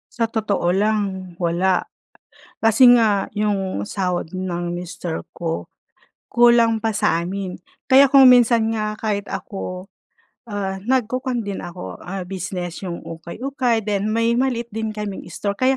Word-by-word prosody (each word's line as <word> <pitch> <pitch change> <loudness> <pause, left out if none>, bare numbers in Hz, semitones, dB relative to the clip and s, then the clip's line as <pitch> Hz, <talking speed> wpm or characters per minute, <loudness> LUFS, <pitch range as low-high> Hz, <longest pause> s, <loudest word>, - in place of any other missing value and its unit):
Sa 230 -1 0
totoo 215 -5 -1
lang, 200 -3 -1
wala. 175 +2 +1 0.7
Kasi 225 +3 +6
nga 210 -4 +2
yung 195 - -1
sahod 180 - -2
ng 175 -2 -3
mister 175 -1 -5
ko, 165 -1 -4 0.6
kulang 235 -2 +4
pa 225 - +1
sa 170 -5 +1
amin. 185 +1 -4 0.3
Kaya 270 +1 +6
kung 270 -1 +8
minsan 235 -3 +5
nga, 215 -1 -3
kahit 205 -2 -2
ako, 190 -1 -6 0.6
ah, 195 -2 -3
nagkukwan 250 +1 -1
din 200 -1 -4
ako 175 +1 -8
ah, 190 +1 -5
business 180 -1 -5
yung 175 -3 -6
ukay-ukay 230 - -2
then 205 0 -1
may 230 +1 +2
maliit 240 -3 -1
din 220 +1 -2
kaming 210 -2 -5
store, 200 - -3
kaya 260 +1 +3
205 Hz, 135 wpm, -21 LUFS, 185-230 Hz, 0.7 s, kung